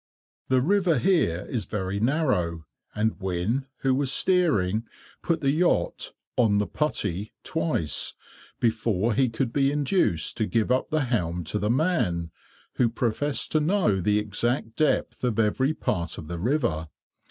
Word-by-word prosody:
The 130 Hz, -1 st, +3 dB
river 180 Hz, 0 st, +2 dB
here 115 Hz, -, +1 dB
is 115 Hz, -4 st, -2 dB
very 100 Hz, -1 st, -3 dB
narrow, 105 Hz, -, 0 dB, 0.3 s
and 110 Hz, 0 st, 0 dB
Wynne, 95 Hz, +8 st, -1 dB
who 135 Hz, -1 st, +2 dB
was 135 Hz, 0 st, +1 dB
steering, 115 Hz, -, +2 dB, 0.3 s
put 165 Hz, -1 st, 0 dB
the 135 Hz, -1 st, +2 dB
yacht 155 Hz, -, 0 dB, 0.2 s
"on 110 Hz, -4 st, +3 dB
the 105 Hz, -, +1 dB
putty" 105 Hz, -, -2 dB
twice, 160 Hz, -, -1 dB, 0.4 s
before 115 Hz, -2 st, +1 dB
he 130 Hz, +2 st, +2 dB
could 115 Hz, +1 st, -2 dB
be 140 Hz, -1 st, +2 dB
induced 145 Hz, -, 0 dB
to 110 Hz, -, 0 dB
give 115 Hz, +1 st, 0 dB
up 130 Hz, -, +1 dB
the 155 Hz, -1 st, +1 dB
helm 90 Hz, -8 st, -1 dB
to 105 Hz, +7 st, -3 dB
the 105 Hz, -, -1 dB
man, 115 Hz, -, 0 dB, 0.5 s
who 120 Hz, -, +3 dB
professed 120 Hz, +5 st, -1 dB
to 155 Hz, -, +3 dB
know 155 Hz, -, +2 dB
the 105 Hz, +3 st, +2 dB
exact 110 Hz, +3 st, -1 dB
depth 155 Hz, -, 0 dB
of 120 Hz, -4 st, 0 dB
every 115 Hz, +6 st, +2 dB
part 85 Hz, -5 st, -2 dB
of 75 Hz, -, -8 dB
the 85 Hz, +1 st, -5 dB
river. 110 Hz, -, 0 dB
115 Hz, 155 wpm, -26 LUFS, 100-145 Hz, 0.5 s, The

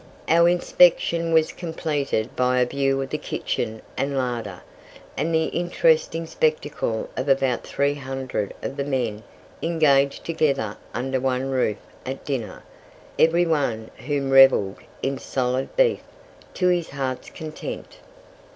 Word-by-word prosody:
Our 170 Hz, +2 st, +5 dB
inspection 170 Hz, -1 st, +3 dB
was 160 Hz, -1 st, +4 dB
completed 150 Hz, -8 st, -2 dB
by 125 Hz, 0 st, +2 dB
a 125 Hz, -, +4 dB
view 135 Hz, +1 st, 0 dB
of 135 Hz, -, -8 dB
the -, -, -2 dB
kitchen 110 Hz, 0 st, -3 dB
and 140 Hz, 0 st, -1 dB
larder, 120 Hz, -8 st, -3 dB, 0.5 s
and 165 Hz, -, -1 dB
the 160 Hz, -1 st, +2 dB
interesting 165 Hz, -1 st, +1 dB
spectacle 150 Hz, -8 st, -1 dB
of 130 Hz, +2 st, -2 dB
about 135 Hz, -2 st, +1 dB
300 135 Hz, -6 st, -2 dB
of 135 Hz, -, -4 dB
the 140 Hz, -, 0 dB
men 125 Hz, -6 st, -2 dB, 0.4 s
engaged 145 Hz, -4 st, +2 dB
together 140 Hz, -10 st, 0 dB, 0.2 s
under 130 Hz, +1 st, -2 dB
one 130 Hz, +1 st, -1 dB
roof 125 Hz, -5 st, +1 dB, 0.3 s
at 135 Hz, +1 st, -6 dB
dinner, 130 Hz, -6 st, -4 dB, 0.6 s
every 170 Hz, +2 st, +4 dB
one 135 Hz, -9 st, -1 dB
of -, -, -13 dB
whom 140 Hz, -2 st, -1 dB
revelled 135 Hz, -8 st, +6 dB, 0.3 s
in 135 Hz, 0 st, -1 dB
solid 130 Hz, 0 st, -2 dB
beef -, -, +3 dB, 0.5 s
to 180 Hz, -1 st, +2 dB
his 175 Hz, -2 st, +1 dB
heart's 135 Hz, -2 st, -4 dB
content. 160 Hz, -, -7 dB
135 Hz, 135 wpm, -24 LUFS, 130-160 Hz, 0.6 s, revelled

